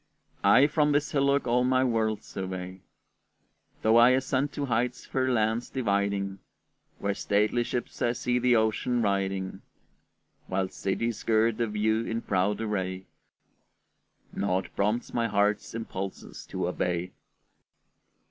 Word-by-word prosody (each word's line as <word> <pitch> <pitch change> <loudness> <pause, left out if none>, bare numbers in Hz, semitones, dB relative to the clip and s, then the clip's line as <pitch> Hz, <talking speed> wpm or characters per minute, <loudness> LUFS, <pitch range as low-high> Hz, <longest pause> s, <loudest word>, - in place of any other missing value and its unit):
I 135 - +7
from 150 0 +2
this 145 +1 +1
hillock 140 0 +2
all 125 +1 +2
my 130 0 +3
world 110 -4 0
survey! 95 -1 -6 1.0
Though 110 +1 +5
I 120 +1 +8
ascend 130 +2 0
to 145 - -2
heights 125 0 -1
fair 130 0 0
lands 110 +1 0
dividing, 100 -4 -1 0.6
Where 100 0 -1
stately 105 +4 +1
ships 120 +1 -4
I 120 - +2
see 125 0 0
the 125 0 +3
ocean 115 +2 +1
riding, 95 -1 -1 0.9
While 95 0 -1
cities 110 +5 -2
gird 110 0 +2
the 115 - +1
view 110 +1 0
in 115 0 -3
proud 100 +2 0
array, 95 -3 -3 1.3
Naught 95 -1 -1
prompts 105 +4 -1
my 115 -1 +1
heart's 105 +1 0
impulses 100 -4 -6
to - - -2
obey. 90 0 -2
110 Hz, 130 wpm, -28 LUFS, 100-120 Hz, 1.3 s, I